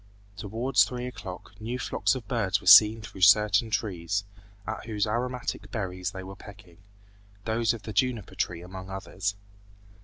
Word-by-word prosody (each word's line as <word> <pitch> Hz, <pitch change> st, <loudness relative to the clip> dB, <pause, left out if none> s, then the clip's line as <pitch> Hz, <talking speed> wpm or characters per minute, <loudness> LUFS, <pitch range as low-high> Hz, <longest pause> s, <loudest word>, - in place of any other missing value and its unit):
Towards 115 Hz, +6 st, +2 dB
three 125 Hz, -1 st, -4 dB
o'clock 100 Hz, -7 st, -8 dB
new 120 Hz, +3 st, -3 dB
flocks 130 Hz, -, 0 dB
of 120 Hz, -5 st, -7 dB
birds 105 Hz, -4 st, 0 dB
were -, -, -16 dB
seen 105 Hz, +3 st, +8 dB
through 95 Hz, -3 st, -10 dB
certain 105 Hz, +3 st, +5 dB
trees, 100 Hz, -3 st, -2 dB, 0.4 s
at 110 Hz, +1 st, -5 dB
whose 105 Hz, -3 st, 0 dB
aromatic 120 Hz, -2 st, -3 dB
berries 95 Hz, -3 st, -3 dB
they 95 Hz, -1 st, -8 dB
were 95 Hz, +1 st, -9 dB
pecking, 100 Hz, -3 st, -14 dB, 0.7 s
those 115 Hz, 0 st, +1 dB
of 115 Hz, -2 st, -6 dB
the 110 Hz, +1 st, -6 dB
juniper 125 Hz, -6 st, 0 dB
tree 85 Hz, -1 st, -3 dB
among 95 Hz, +1 st, -9 dB
others. 95 Hz, +1 st, -4 dB
105 Hz, 155 wpm, -27 LUFS, 95-115 Hz, 0.7 s, seen